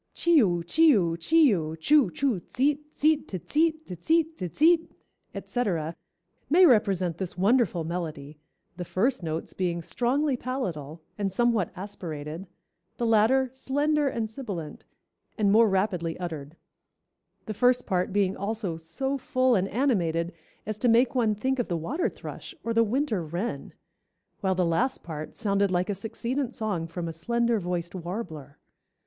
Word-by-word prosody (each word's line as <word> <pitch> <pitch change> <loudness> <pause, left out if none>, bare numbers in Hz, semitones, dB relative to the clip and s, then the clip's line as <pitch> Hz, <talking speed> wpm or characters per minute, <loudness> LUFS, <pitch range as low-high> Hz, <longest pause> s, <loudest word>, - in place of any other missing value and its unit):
Chee 340 -2 +4
oo, 175 -5 +1
chee 315 - +5
oo, 170 -3 +1
chee 305 - +4
oo, 160 -3 -2
choo, 275 - +4
choo, 245 - 0
tseet, 280 +10 0
tseet, 305 -1 +2
te 190 - -4
tseet, 315 - 0
te 180 - -7
tseet, 320 - +1
te 180 - -4
tseet, 330 - +3 0.5
etc., 170 -10 -2 0.5
may 360 +5 +7
represent 195 - +2
this 185 -2 -4
wonderful 195 -3 +2
melody, 155 -3 -5 0.4
the 180 - -4
first 225 +9 0
notes 160 -1 -4
being 175 -2 -1
strongly 260 - 0
palatal 170 - -4 0.2
and 200 -1 0
somewhat 230 -3 +1
aspirated, 170 -3 -6 0.5
the 240 - -1
latter 230 +4 +4
slender 290 +3 0
and 230 -4 -1
sibilant 210 - -7 0.5
and 205 -2 +3
more 225 +1 +6
rapidly 190 -4 0
uttered; 160 -4 -6 0.9
the 215 - -4
first 250 +3 +3
part 180 0 0
being 195 -1 +1
also 200 -4 -3
so 265 +13 -2
full 255 -2 +2
and 195 -3 +2
animated 180 - 0 0.3
as 215 0 -4
to 250 - +1
make 235 +2 +4
one 225 -5 +2
think 260 +5 -1
of 245 - 0
the 175 - -1
water 255 - -1
thrush, - - -9
or 230 - -1
the 230 0 +4
winter 230 - 0
wren; 170 -1 -4 0.7
while 190 -1 0
the 180 -1 +1
last 225 +11 0
part 155 -2 -7
sounded 200 -2 +1
like 180 +2 0
a - - 0
succeedant 240 +6 -3
song 200 -7 -2
from 170 +1 -5
a 165 - -4
slender 235 +7 0
voiced 175 -2 -3
warbler. 170 - -6
205 Hz, 155 wpm, -27 LUFS, 170-255 Hz, 0.9 s, may